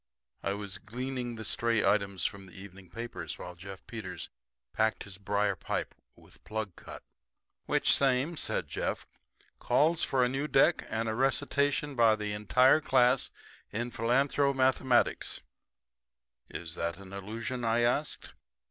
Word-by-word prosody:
I 100 - -1
was 100 -1 -5
gleaning 125 +1 -4
the 110 -1 -6
stray 115 -2 +1
items 100 -4 +1
from 95 -1 -3
the 90 - -12
evening 95 -2 -12
papers 115 +1 -6
while 90 - -7
Jeff 95 +2 -10
Peters 110 -5 -6 0.4
packed 110 -2 +1
his 95 -1 -10
briar 100 0 +1
pipe - - -3 0.2
with - - -19
plug 110 -4 -4
cut. - - -10 0.6
"Which - - +3
same," 135 +4 +2
said - - -2
Jeff, - - -3 0.5
"calls 160 +3 +2
for 130 -2 +2
a - - +2
new 135 +4 -2
deck, 155 +4 +3
and 115 +1 -1
a 110 - 0
recitation 140 +3 +1
by 115 -3 +5
the 105 -1 -3
entire 125 +8 +4
class 125 -3 +4 0.4
in 120 +3 -3
philanthromathematics." 130 +1 +2 1.1
"Is 80 -1 -6
that 85 0 -3
an 100 0 -12
allusion?" 110 +5 -4
I 115 +1 +2
asked. 125 +6 0
115 Hz, 140 wpm, -30 LUFS, 100-130 Hz, 1.1 s, by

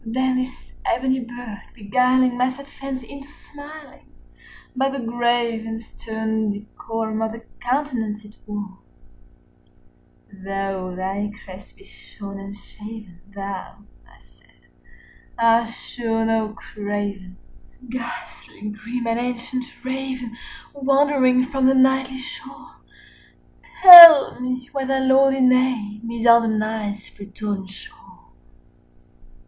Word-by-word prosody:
Then 255 +3 -1
this 255 0 -6
ebony 260 +2 0
bird 240 -4 -9
beguiling 250 +3 +1
my 250 +1 +1
sad 275 +2 -10
fancy 270 -3 -8
into 280 0 -11
smiling 295 -1 -14 0.7
By 265 +1 +1
the 275 - -5
grave 235 -1 -1
and 225 0 -5
stern 220 -1 -4
decorum 220 +1 -5
of 220 0 -2
the 230 - -10 0.2
countenance 245 -5 -3
it 210 - -15
wore, 205 -2 -7 1.5
"Though 195 -1 -5
thy 195 +3 -4
crest 190 0 -13
be 390 - -19
shorn 200 - -11
and 200 +1 -9
shaven, 210 -4 -12
thou," 200 0 -8 0.2
I - - -22
said, - - -30 0.7
"art 230 0 +3
sure 225 -1 -4
no 220 -1 -1
craven, 205 -3 -6 0.4
45 250 - -16
Ghastly 235 -3 -8
grim 235 +3 -6
and 230 0 -1
ancient 250 +1 -4 0.2
Raven 260 -2 -5 0.4
wandering 275 -2 +2
from 265 0 0
the 265 - +3
Nightly 265 0 +2
shore: 260 - -11 1.1
Tell 335 -8 +12
me 255 0 -4
what 275 -2 -3
thy 270 0 0
lordly 265 0 +3
name 245 -4 +1
is 235 0 -5
on 235 0 +7
the 220 -1 -1
Night's 215 -1 -4
Plutonian 200 -1 -6
shore!" 190 - -15
235 Hz, 120 wpm, -21 LUFS, 210-260 Hz, 1.5 s, Tell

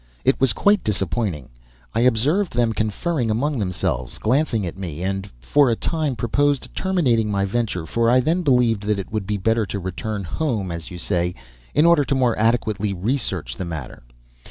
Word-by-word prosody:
It 135 0 +2
was 135 -3 +4
quite 205 - +3
disappointing. 95 - -2 0.4
I - - 0
observed 130 - +2
them 120 -2 +2
conferring 115 - -1
among 135 +5 0
themselves, 90 - -2
glancing 115 -3 +1
at 85 - -5
me, 90 -3 -6
and 95 +1 -2
for 140 - +3
a 115 - +2
time 155 0 -1
proposed 140 +5 0
terminating 130 - +1
my 100 -1 +1
venture, 100 -5 -2
for 115 +8 +1
I 125 +2 +5
then 165 +8 +1
believed 125 - +3
that 105 -1 +1
it 100 - -6
would 105 -3 -3
be 105 0 -1
better 110 +2 +1
to 100 - -4
return 100 +3 -4
"home," 105 - -2
as 85 -1 -6
you 90 - -8
say, 90 -1 -1 0.4
in 150 - +5
order 170 -3 +5
to 140 - 0
more 125 -3 +2
adequately 110 -3 +1
research 95 - -2
the - - -3
matter. 80 -6 -7
110 Hz, 180 wpm, -22 LUFS, 95-130 Hz, 0.4 s, I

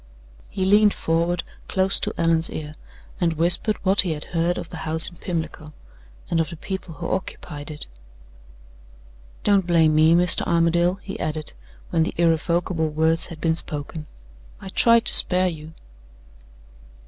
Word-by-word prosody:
He 190 - -2
leaned 205 +1 +4
forward 170 +1 0 0.2
close 190 0 0
to - - -2
Allan's 165 -1 +1
ear, 150 -1 -6 0.5
and 170 -3 +1
whispered 175 +6 +2
what 190 +1 +5
he 175 -4 -1
had 150 - -6
heard 170 +1 0
of 170 - -6
the - - -7
house 160 0 -1
in 175 - -11
Pimlico, 160 -3 -5 0.5
and 165 - 0
of 165 - 0
the 170 - -8
people 190 -1 -6
who 170 0 -5
occupied 150 -5 -5
it. 150 -1 -8 1.6
"Don't 200 -3 +2
blame 165 -3 +4
me, 155 +2 +5
Mr. 180 0 +5
Armadale," 170 +1 +2
he 195 - -7
added, 155 0 -1 0.4
when 165 - +1
the 160 - -1
irrevocable 165 0 +1
words 160 +2 +2
had 165 -3 -10
been 160 +1 +1
spoken. 150 0 -6 0.5
"I 195 -2 -9
tried 230 +4 +4
to - - +3
spare 185 0 +4
you." 160 -1 -9
165 Hz, 155 wpm, -23 LUFS, 160-180 Hz, 1.6 s, what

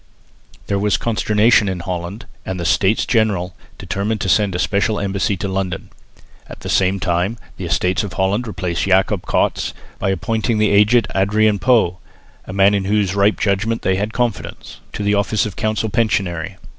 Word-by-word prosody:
There 100 -1 -1
was 105 0 +1
consternation 110 -1 +2
in 90 -2 -4
Holland, 90 +4 -5 0.2
and 95 -1 -4
the 85 - -3
States 95 +5 +2
General 100 -6 +1 0.2
determined 105 +3 -2
to 95 - -1
send 100 -1 +2
a - - 0
special 100 +4 0
embassy 100 0 -1
to 100 - -3
London. 95 -1 -3 0.6
At - - -11
the - - -6
same 95 +1 +2
time 90 +6 -1 0.2
the 95 - -5
Estates 85 +3 +1
of 100 -4 -6
Holland 100 +6 0
replaced 90 -5 -2
Jacob 95 0 +1
Cats - - 0 0.2
by - - 0
appointing 110 +5 -1
the 105 -1 +2
aged 105 +4 +4
Adrian 105 +2 +2
Pauw, 110 -6 +3 0.5
a - - -6
man 100 +1 +4
in 100 -1 0
whose 100 -2 +1
ripe 100 +1 +2
judgment 105 +3 0
they 95 - +2
had 105 +2 -2
confidence, 120 -4 -4
to - - -4
the 100 0 +2
office 100 +1 +1
of 105 - -5
council 110 0 -1
pensionary. 100 -7 -1
100 Hz, 175 wpm, -19 LUFS, 95-110 Hz, 0.6 s, aged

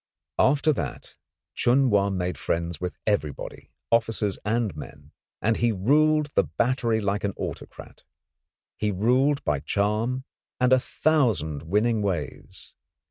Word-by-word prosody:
After 145 +3 +4
that 70 - -6 0.4
Chun 130 +1 +3
Wa 100 -1 +3
made 90 -2 -2
friends 85 -1 -3
with 90 -1 -4
everybody, 80 -10 -3 0.2
officers 115 -3 +1
and 110 -4 -1
men, 75 - -11 0.3
and 110 +1 +2
he 120 -1 +2
ruled 150 +8 +2
the - - +4
battery 115 - 0
like 100 -1 -1
an 100 -1 -2
autocrat. - - -8 0.7
He 105 - 0
ruled 130 +9 +2
by 75 -2 0
charm 105 - -1 0.4
and 125 0 +4
a 130 - +6
thousand 115 - 0
winning 105 +7 +1
ways. 95 -4 -5
110 Hz, 130 wpm, -25 LUFS, 95-125 Hz, 0.7 s, a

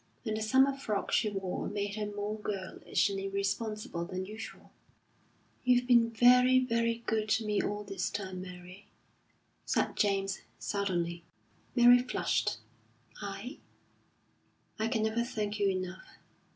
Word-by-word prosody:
And 215 -2 -1
the 215 - -3
summer 265 +5 +4
frock 215 -7 -3
she 215 - +3
wore 195 -3 -3
made 205 0 -2
her 210 0 -3
more 205 +1 -4
girlish 195 -1 -1
and 195 - -2
irresponsible 200 -1 -2
than 185 +1 -4
usual. 215 +3 -9 0.9
"You've 250 -1 +4
been 235 -2 +5
very, 250 +2 +6
very 230 -2 +1
good 215 -1 0
to 220 +1 +2
me 210 -1 +1
all 205 0 -3
this 195 -2 -3
time, 185 -2 -5
Mary," 180 +1 -11 0.8
said - - 0
James, 195 -1 0 0.2
suddenly. 175 -4 -2 0.5
Mary 245 0 +8
flushed. 120 - 0 0.6
"I?" 200 +6 -6 1.2
"I 220 - +1
can 225 -2 0
never 220 +2 +1
thank 210 -3 -3
you 200 -1 +3
enough." 185 0 -5
210 Hz, 135 wpm, -31 LUFS, 195-230 Hz, 1.2 s, Mary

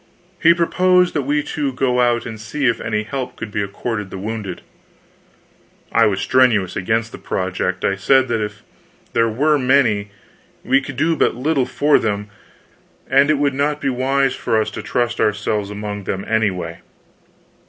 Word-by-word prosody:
He 170 +1 +6
proposed 180 +1 +3
that 145 - 0
we 150 0 +1
two 145 -2 -2
go 125 -1 0
out 120 -1 +2
and 110 -2 -7
see 130 +6 -3
if 120 -2 +1
any 105 -1 -1
help 130 +2 -5
could 110 -2 -6
be 105 - -1
accorded 105 +1 -4
the - - -7
wounded. 105 -2 -5 1.3
I - - +4
was 100 -2 0
strenuous 115 -8 +3
against 110 +4 -1
the - - -10
project. 95 0 -2
I 100 - +1
said 130 +6 +3
that 115 -2 0
if 105 0 -7 0.5
there 115 0 +2
were 145 +6 +2
many, 125 -6 +2 0.5
we 135 - +3
could 135 -2 -8
do 165 +1 +2
but - - +1
little 135 +1 0
for 145 0 +3
them; 105 -2 -2 0.8
and 140 +2 +5
it 155 - +3
would 140 -1 +1
not 145 +2 0
be 135 - -1
wise 135 +1 +1
for 110 - 0
us 110 - -1
to - - -6
trust 120 -1 -1
ourselves 105 0 0
among 105 -1 -5
them, 95 +1 -3
anyway. 90 -7 -1
115 Hz, 175 wpm, -19 LUFS, 105-140 Hz, 1.3 s, He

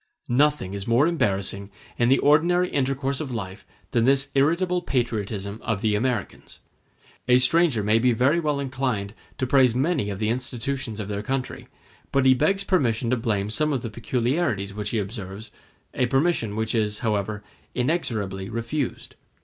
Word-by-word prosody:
Nothing 140 -6 +2
is 100 -1 -5
more 120 +5 +4
embarrassing 100 - -1 0.3
in 120 0 +3
the 135 - +5
ordinary 175 +5 +3
intercourse 135 0 -1
of 145 -4 -4
life 100 -4 -6 0.2
than 115 -1 +2
this 135 +1 +2
irritable 170 +6 +2
patriotism 110 - -2
of 110 -4 -2
the 110 -2 +1
Americans. 120 -1 -2 0.7
A 125 0 +6
stranger 130 -2 +3
may 105 +2 +3
be 125 +1 +3
very 130 +8 +3
well 150 -3 0
inclined 130 -7 -2 0.2
to 130 - -1
praise 130 -2 +4
many 140 -4 0
of 100 - -4
the 105 +1 -1
institutions 125 -1 -3
of 100 - -4
their 100 0 -3
country, 130 +3 -4 0.4
but 135 -1 +2
he 130 - +7
begs 195 +10 +1
permission 125 - +1
to - - +4
blame 105 -3 -1
some 150 +7 +1
of 135 -3 -1
the 115 - -5
peculiarities 120 - -1
which 105 0 -4
he 115 - -1
observes—a 105 +4 -5
permission 135 -6 +1
which 110 0 -1
is, 105 -2 0
however, 105 -1 -1 0.3
inexorably 110 - -1
refused. 115 +5 -3
120 Hz, 160 wpm, -24 LUFS, 105-140 Hz, 0.7 s, he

